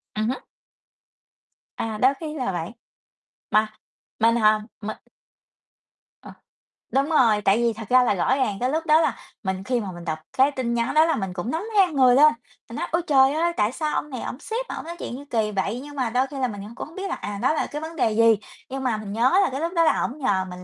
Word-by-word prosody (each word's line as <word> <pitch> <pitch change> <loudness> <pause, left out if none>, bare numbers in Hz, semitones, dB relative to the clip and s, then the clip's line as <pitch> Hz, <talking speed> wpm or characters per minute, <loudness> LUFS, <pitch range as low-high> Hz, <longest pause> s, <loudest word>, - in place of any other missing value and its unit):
Ừm 215 +1 0
hứm. 260 - -2 1.4
À, 220 -1 -3
đôi 260 +2 +5
khi 310 -2 -5
là 255 -8 -2
vậy. 175 +1 -4 0.8
Mà 215 0 +2 0.5
mình 230 +1 +4
hả? 215 -2 +4 0.2
Mình 215 0 -5 1.3
Ờ, - - -11 0.6
đúng 275 +4 +1
rồi, 230 -9 +4
tại 195 +1 +3
vì 230 -1 +2
thật 220 -2 -9
ra 255 0 +6
là 225 - +2
rõ 190 +9 +2
ràng 220 -7 0
cái 250 - 0
lúc 320 +3 -1
đó 310 +1 +5
là 320 - 0 0.3
mình 190 -1 -2
khi 245 +3 0
mà 200 -4 -5
mình 175 -1 -10
đọc 160 -2 -3 0.2
cái 270 +2 +5
tin 255 -4 -2
nhắn 235 0 0
đó 310 +1 +6
là 325 - +1
mình 195 -3 -3
cũng 190 +7 -4
nóng 325 +5 -2
ran 360 -6 +4
người 255 -2 +5
lên, 300 +3 +7 0.4
mình 230 - -8
nói: - - -3
"Ôi 340 - +1
trời 270 -1 +5
ơi, 340 +2 +1
tại 210 +1 +2
sao 305 +3 -2
ông 300 - -2
này 255 - -5
ổng - - -5
làm 250 - -6
sếp 460 +9 -4
mà - - -4
ổng - - -7
nói 340 +1 -6
chuyện - - -5
gì 285 - -9
kỳ 220 -2 0
vậy?" 200 +4 -2
Nhưng 290 0 -10
mà 255 -4 -1
đôi 255 +3 +1
khi 280 - -8
là 255 - +1
mình 205 -4 -7
c 210 +4 -10
cũng - - -6
hông 320 - -16
biết 390 0 -4
là, - - -2
à, 205 -1 -6
đó - - +3
là 315 - -1
cái 295 +1 -6
vấn 325 +1 -7
đề 230 -7 +1
gì, 225 0 +5 0.3
nhưng 265 0 -4
mà 240 -4 0
mình 205 -1 -6
nhớ 255 - +3
là - - +1
cái 270 - -4
lúc 335 +2 -2
đó 335 - +4
là 320 - +3
ổng 260 - -3
nhờ 195 -9 0
mình 180 0 -9
250 Hz, 260 wpm, -24 LUFS, 215-300 Hz, 1.4 s, lên